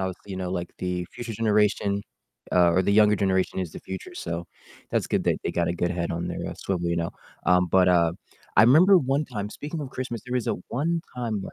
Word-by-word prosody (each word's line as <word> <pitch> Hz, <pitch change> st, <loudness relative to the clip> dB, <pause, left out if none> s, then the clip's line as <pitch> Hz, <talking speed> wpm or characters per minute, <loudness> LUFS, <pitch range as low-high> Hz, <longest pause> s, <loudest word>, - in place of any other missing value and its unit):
obviously, 95 Hz, +1 st, -5 dB
you -, -, -4 dB
know, 90 Hz, -1 st, -3 dB
like 90 Hz, -1 st, -3 dB
the 90 Hz, -1 st, -2 dB
future 120 Hz, -1 st, -6 dB
generation, 105 Hz, -2 st, +1 dB, 0.5 s
uh, 90 Hz, -1 st, +5 dB
or 90 Hz, +2 st, +3 dB
the 100 Hz, -, +1 dB
younger 105 Hz, 0 st, +5 dB
generation 95 Hz, -1 st, +1 dB
is 90 Hz, -4 st, -3 dB
the -, -, -8 dB
future, 95 Hz, -1 st, -8 dB
so 85 Hz, +1 st, -4 dB, 0.5 s
that's -, -, 0 dB
good -, -, 0 dB
that -, -, +2 dB
they -, -, 0 dB
got 85 Hz, -1 st, 0 dB
a 85 Hz, -, +1 dB
good 85 Hz, 0 st, -1 dB
head 85 Hz, -1 st, -2 dB
on 85 Hz, +1 st, -3 dB
their, -, -, -4 dB
uh, -, -, -7 dB
swivel, 85 Hz, -3 st, -2 dB
you 85 Hz, -, 0 dB
know? 85 Hz, 0 st, -1 dB, 0.4 s
Um, 90 Hz, 0 st, +4 dB
but, 95 Hz, -1 st, +5 dB
uh, 85 Hz, -2 st, +4 dB, 0.4 s
I 100 Hz, -, +8 dB
remember 170 Hz, -, +7 dB
one 140 Hz, 0 st, 0 dB
time 105 Hz, -6 st, -5 dB
speaking 150 Hz, +7 st, -6 dB
of 140 Hz, -3 st, -6 dB
Christmas, 125 Hz, -4 st, -5 dB
there 125 Hz, -, -3 dB
was 125 Hz, -3 st, 0 dB
a -, -, +1 dB
one 165 Hz, +7 st, 0 dB, 0.2 s
time 115 Hz, -4 st, -2 dB
where -, -, -8 dB
100 Hz, 240 wpm, -25 LUFS, 90-120 Hz, 0.5 s, I